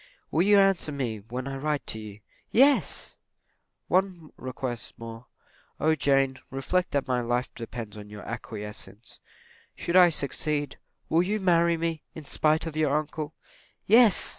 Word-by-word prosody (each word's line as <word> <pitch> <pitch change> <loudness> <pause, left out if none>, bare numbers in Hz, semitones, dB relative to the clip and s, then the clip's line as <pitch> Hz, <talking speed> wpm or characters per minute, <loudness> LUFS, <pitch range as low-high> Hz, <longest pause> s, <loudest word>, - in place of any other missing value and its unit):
"Will 160 - +2
you 205 +2 +5
answer 195 -5 +3
me 125 -7 -3
when 125 +5 -6
I 135 0 -4
write 150 +1 -2
to 110 - -3
you?" 105 -1 -10 0.3
"Yes!" 275 +4 +3 0.7
"One 180 -4 0
request 130 -2 -5
more 115 +1 -9 0.5
O 160 +1 +3
Jane, 135 -3 +2
reflect 180 +7 -1
that 140 -1 -1
my 125 -1 +1
life 120 +1 -1
depends 115 -2 -7
upon 105 -1 -10
your 105 0 -9
acquiescence 105 -1 -8 0.6
should 170 - -3
I 180 -1 +8
succeed, 145 -1 -2 0.3
will 165 - +3
you 205 +4 0
marry 170 -3 +3
me, 165 -2 -2
in 160 - -7
spite 155 +3 +2
of 160 -2 -5
your 150 -2 +2
uncle?" 155 0 -4 0.5
"Yes!" 225 -1 +6
145 Hz, 150 wpm, -27 LUFS, 120-170 Hz, 0.7 s, I